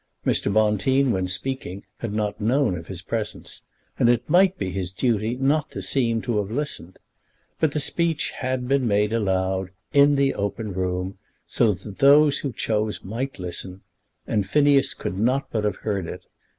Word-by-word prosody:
Mr. - - +1
Bonteen 110 +6 +2
when 95 -3 0
speaking 95 0 -3 0.2
had 115 - -4
not 105 -1 -2
known 125 -1 +2
of 85 -1 -8
his 95 -2 -6
presence, 110 +1 -3 0.4
and 120 - +4
it 120 -1 +2
might 185 +1 +4
be 95 - -3
his 90 -1 -3
duty 110 +3 0
not 145 +4 +1
to - - -7
seem 115 -4 +2
to 120 -4 0
have 100 -1 -3
listened. 120 - -3 0.6
But 155 -3 +2
the 150 - 0
speech 165 +2 0
had 130 -1 -3
been 135 -2 +2
made 105 +1 +2
aloud, 95 -3 0 0.2
in 145 0 +6
the 140 -1 +2
open 100 +1 -3
room, 90 +1 -3 0.3
so 110 -5 +2
that 95 +2 -11
those 145 +1 +6
who 140 - -3
chose 110 -2 -2
might 125 +7 -4
listen; 90 +1 -5 0.4
and 105 -4 -1
Phineas 140 +2 +3
could 95 - -4
not 130 +5 +1
but 110 -2 -1
have 105 - 0
heard 100 -5 -1
it. - - -7
110 Hz, 175 wpm, -24 LUFS, 95-135 Hz, 0.6 s, in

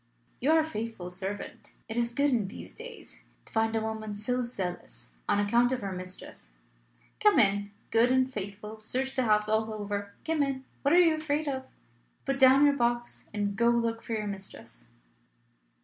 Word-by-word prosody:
"You 270 - +1
are 325 - +6
a - - +3
faithful 220 - -5
servant: 190 +2 -6
it 225 - -5
is 235 0 +2
good, 280 +4 +2
in 225 -6 +1
these 200 - -9
days, 470 0 -10 0.2
to - - -12
find 225 0 +2
a 225 - +1
woman 220 -1 -4
so 245 +5 -1
zealous 180 - -5 0.2
on - - +3
account 235 +4 +3
of 255 -1 -1
her 195 - -3
mistress. 185 - -5 0.7
Come - - +5
in, 200 0 +3 0.2
good 230 +2 +5
and 260 0 +4
faithful. 210 -2 -6
Search 260 +5 -2
the 260 -2 +1
house 210 -1 +3
all 220 +1 +1
over. 205 -1 -4
Come 320 -2 +1
in 270 -2 -1 0.2
what 280 - +2
are - - +8
you 335 -3 +6
afraid 310 -1 -1
of? 265 -2 -3 0.6
Put 275 0 -1
down 265 +2 +7
your 285 -1 +5
box, 240 -2 -1
and 205 -1 -1
go 235 +2 +4
and 235 0 +3
look 230 0 -1
for 230 - -5
your 215 -1 -1
mistress." 190 - -6
225 Hz, 190 wpm, -29 LUFS, 205-260 Hz, 0.7 s, are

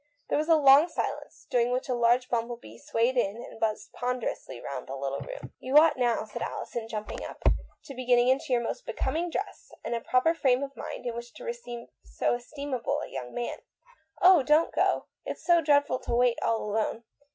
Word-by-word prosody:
There - - +2
was 310 +2 -2
a 325 - +7
long 285 +1 +7
silence, 335 - -5
during 245 -2 +3
which 250 +1 -1
a 255 - 0
large 240 +1 +3
bumble 235 0 -1
bee 115 - -14
swayed 235 - 0
in 200 -4 +1
and 235 - -10
buzzed 215 -1 -2
ponder 250 -1 -1
ously 130 -2 -8
round 130 -1 -6
the 135 - -5
little 135 0 -3
room. 135 -1 -8
"You 260 +3 +2
ought 310 0 +7
now," 240 -3 +1
said 210 - -8
Alison, 230 -2 -4
jumping 215 -1 -5
up, - - -9 0.2
" - - -28
to 275 - -8
be 255 -1 -6
getting 245 0 +5
into 265 +2 +1
your 240 -1 +2
most - - -5
becoming 345 +2 -1
dress, - - -5
and - - -3
a 235 - -2
proper 255 +8 +3
frame 265 -5 +2
of 275 0 -6
mind - - -7
in 240 - -2
which 235 0 -8
to - - -10
receive 470 - -6
so - - -1
estimable 260 +1 -3
a - - -6
young 125 -2 -6
man 240 - -3 0.3
" 320 -6 -30
"Oh, 365 -3 +8
don't 300 +4 +3
go. - - +2 0.2
It's - - -6
so 345 -2 +5
dreadful 285 -3 +3
to - - -2
wait 245 -1 +3
all 225 -1 0
alone. 220 +2 -1
245 Hz, 220 wpm, -28 LUFS, 230-285 Hz, 0.3 s, Oh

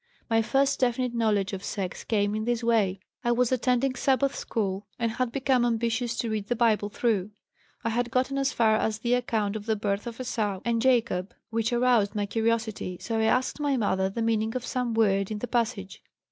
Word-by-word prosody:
"My 225 0 +4
first 270 +4 +1
definite 250 -1 +1
knowledge 210 -4 +1
of 195 0 -5
sex 190 -3 -4
came 205 -2 +1
in 215 0 -2
this 240 0 0
way: 205 -5 +2 0.2
I 240 - +2
was 245 0 +2
attending 255 +1 +1
Sabbath 270 +1 +1
school 200 -2 -3
and 230 -2 0
had 245 +1 -1
become 265 -1 +2
ambitious 235 0 0
to 230 - -1
read 210 -2 -2
the 245 - 0
Bible 220 -3 +2
through. 210 -3 0 0.5
I 230 - 0
had 240 +1 0
gotten 260 +3 0
as 275 0 +1
far 220 -3 +3
as 220 -1 0
the 235 +2 0
account 220 -4 0
of 215 0 -6
the 220 - +2
birth 205 +1 -2
of 235 +1 -7
Esau 215 -6 -2
and 230 -1 +1
Jacob, 230 -7 +1 0.2
which 225 +1 0
aroused 240 -4 +2
my 205 -1 0
curiosity. 220 -4 -1
So 225 +4 -2
I 220 - +2
asked 255 +5 +1
my 285 -2 +1
mother 190 -4 +1
the 225 +4 -3
meaning 225 0 0
of 250 -1 -3
some 245 -3 -2
word 195 -3 +2
in 215 - -3
the 245 - -4
passage. 230 -5 -2
230 Hz, 205 wpm, -27 LUFS, 210-245 Hz, 0.5 s, My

